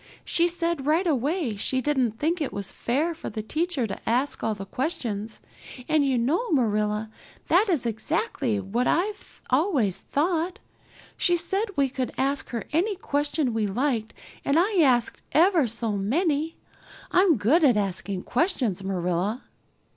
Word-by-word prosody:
She 340 Hz, 0 st, +2 dB
said 335 Hz, -4 st, -1 dB
right 325 Hz, +5 st, +3 dB
away 290 Hz, -, 0 dB
she 260 Hz, +6 st, +1 dB
didn't 260 Hz, -5 st, +1 dB
think 325 Hz, +5 st, 0 dB
it 290 Hz, -, -1 dB
was 200 Hz, -2 st, -4 dB
fair 295 Hz, +8 st, -1 dB
for 330 Hz, -, -7 dB
the 215 Hz, -, -5 dB
teacher 310 Hz, +2 st, -1 dB
to 215 Hz, -, -5 dB
ask 255 Hz, +5 st, 0 dB
all 220 Hz, -1 st, 0 dB
the 195 Hz, -1 st, -7 dB
questions, 225 Hz, -, -3 dB, 0.5 s
and 310 Hz, -2 st, +3 dB
you 270 Hz, -2 st, +1 dB
know, 320 Hz, -, 0 dB
Marilla, 215 Hz, -, +1 dB, 0.4 s
that 395 Hz, +5 st, +4 dB
is 310 Hz, -10 st, +1 dB
exactly 235 Hz, -, -1 dB
what 215 Hz, +6 st, -1 dB
I've 405 Hz, +4 st, -2 dB
always 255 Hz, -, +2 dB
thought. 335 Hz, +3 st, -1 dB, 0.6 s
She 350 Hz, -1 st, +3 dB
said 390 Hz, +5 st, +1 dB
we 280 Hz, -1 st, +3 dB
could 260 Hz, -1 st, -4 dB
ask 275 Hz, +1 st, -1 dB
her 235 Hz, -2 st, -3 dB
any 385 Hz, +6 st, +1 dB
question 290 Hz, -6 st, -1 dB
we 220 Hz, -2 st, 0 dB
liked 230 Hz, +1 st, -1 dB, 0.3 s
and 280 Hz, -, +2 dB
I 380 Hz, +3 st, +3 dB
asked 250 Hz, -6 st, +2 dB
ever 335 Hz, -3 st, +4 dB
so 230 Hz, 0 st, -2 dB
many. 295 Hz, -, 0 dB, 0.5 s
I'm 360 Hz, -5 st, +4 dB
good 270 Hz, -, +3 dB
at 250 Hz, -7 st, +5 dB
asking 195 Hz, -1 st, -2 dB
questions, 245 Hz, -, 0 dB
Marilla." 185 Hz, +4 st, -1 dB
270 Hz, 155 wpm, -26 LUFS, 220-330 Hz, 0.6 s, at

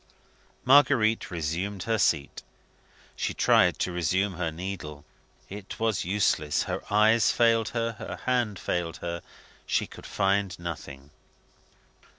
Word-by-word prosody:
Marguerite 130 Hz, -5 st, +4 dB
resumed 90 Hz, +4 st, -3 dB
her 115 Hz, -1 st, 0 dB
seat. 70 Hz, -6 st, 0 dB, 0.7 s
She -, -, -3 dB
tried -, -, +4 dB
to 90 Hz, -, -1 dB
resume 90 Hz, +3 st, 0 dB
her 85 Hz, -2 st, -2 dB
needle. 80 Hz, -4 st, -7 dB, 0.4 s
It 100 Hz, -1 st, -9 dB
was 110 Hz, -5 st, 0 dB
useless; 90 Hz, -6 st, +1 dB
her -, -, -4 dB
eyes 110 Hz, +2 st, +4 dB
failed 115 Hz, -2 st, +3 dB
her; 115 Hz, -1 st, -1 dB
her -, -, -6 dB
hand 120 Hz, -5 st, 0 dB
failed 85 Hz, -2 st, -3 dB
her; 85 Hz, 0 st, -4 dB, 0.5 s
she -, -, +1 dB
could -, -, -12 dB
find 95 Hz, -1 st, 0 dB
nothing. 70 Hz, -5 st, -8 dB
95 Hz, 125 wpm, -27 LUFS, 85-110 Hz, 0.7 s, Marguerite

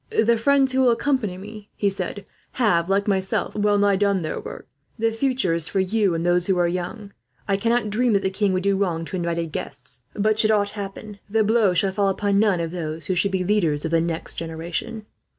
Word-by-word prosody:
"'The 230 Hz, +1 st, +3 dB
friends 270 Hz, +3 st, +3 dB
who 260 Hz, 0 st, +2 dB
will 255 Hz, -, +5 dB
accompany 235 Hz, -6 st, 0 dB
me,' 210 Hz, +2 st, -10 dB
he 205 Hz, -, 0 dB
said, 195 Hz, +1 st, -3 dB, 0.3 s
'have, 185 Hz, -8 st, +2 dB
like 200 Hz, +1 st, +1 dB
myself, 190 Hz, -2 st, -1 dB
well 205 Hz, 0 st, +2 dB
nigh 200 Hz, -1 st, +3 dB
done 200 Hz, -2 st, +1 dB
their 155 Hz, -, -3 dB
work. -, -, -9 dB, 0.3 s
The 225 Hz, 0 st, +1 dB
future 240 Hz, -5 st, 0 dB
is 165 Hz, -1 st, -1 dB
for 195 Hz, -, -1 dB
you 190 Hz, -1 st, +1 dB
and 165 Hz, +1 st, -2 dB
those 175 Hz, 0 st, +2 dB
who 190 Hz, -2 st, +2 dB
are 175 Hz, -1 st, +3 dB
young. 185 Hz, +4 st, -5 dB, 0.3 s
I 195 Hz, -, +2 dB
cannot 230 Hz, +1 st, 0 dB
dream 240 Hz, +2 st, +2 dB
that 200 Hz, -, +2 dB
the 190 Hz, -, 0 dB
king 200 Hz, 0 st, +1 dB
would 185 Hz, 0 st, -1 dB
do 200 Hz, 0 st, +2 dB
wrong 170 Hz, -4 st, -1 dB
to 185 Hz, -, -6 dB
invited 170 Hz, -2 st, -2 dB
guests; 130 Hz, -4 st, -6 dB
but 215 Hz, +1 st, +1 dB
should 215 Hz, -, +5 dB
aught 205 Hz, -2 st, +2 dB
happen, 200 Hz, 0 st, -7 dB
the 220 Hz, +1 st, +2 dB
blow 215 Hz, -3 st, +3 dB
shall 195 Hz, +2 st, +2 dB
fall 200 Hz, 0 st, +1 dB
upon 200 Hz, +1 st, +1 dB
none 205 Hz, -4 st, +3 dB
of 165 Hz, -1 st, -3 dB
those 160 Hz, -3 st, -5 dB
who 185 Hz, -, 0 dB
should 180 Hz, +3 st, +1 dB
be 190 Hz, -1 st, -1 dB
the 200 Hz, +3 st, +1 dB
leaders 160 Hz, -7 st, 0 dB
of 160 Hz, -, -2 dB
the 165 Hz, -1 st, +3 dB
next 165 Hz, -1 st, -3 dB
generation.'" 170 Hz, +7 st, -5 dB
200 Hz, 230 wpm, -23 LUFS, 175-215 Hz, 0.3 s, will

